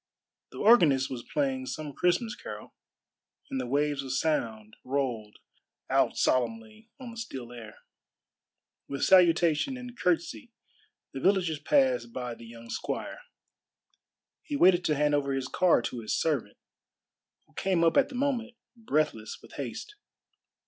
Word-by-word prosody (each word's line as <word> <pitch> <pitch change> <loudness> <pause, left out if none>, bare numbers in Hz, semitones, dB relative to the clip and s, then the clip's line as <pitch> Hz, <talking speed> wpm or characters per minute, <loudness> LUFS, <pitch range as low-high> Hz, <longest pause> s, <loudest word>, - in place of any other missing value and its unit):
The - - -12
organist 155 - +5
was 125 -2 -4
playing 265 -2 -1
some 155 - -5
Christmas 180 - +1
carol, 105 0 -9 0.8
and 130 - -1
the 125 - -5
waves 145 +2 0
of 135 -1 -6
sound 115 -8 -1
rolled 125 -6 -2 0.5
out - - +2
solemnly 220 - -1
on 250 -3 -8
the 230 - -11
still 135 - -7
air. 115 -3 -10 1.1
With 140 - -3
salutation 175 - +4
and 250 -1 -9
curtsey 170 - -1 0.6
the 135 - -5
villagers 180 -2 +2
passed 130 -5 +2
by 125 0 -4
the 115 0 -12
young 115 0 -11
squire. - - -4 1.2
He 295 - -5
waited 180 -8 +5
to 150 - +2
hand 150 +1 +2
over 140 -1 +1
his 135 -1 -2
car 175 -5 +3
to 120 - -4
his 110 - -2
servant, 150 -7 -1 0.9
who - - -30
came 185 -3 +1
up 165 - +3
at 280 0 +4
the 265 - -9
moment, 245 -3 -1 0.2
breathless 155 - -1
with - - -16
haste. 425 - -6
150 Hz, 140 wpm, -28 LUFS, -, 1.2 s, organist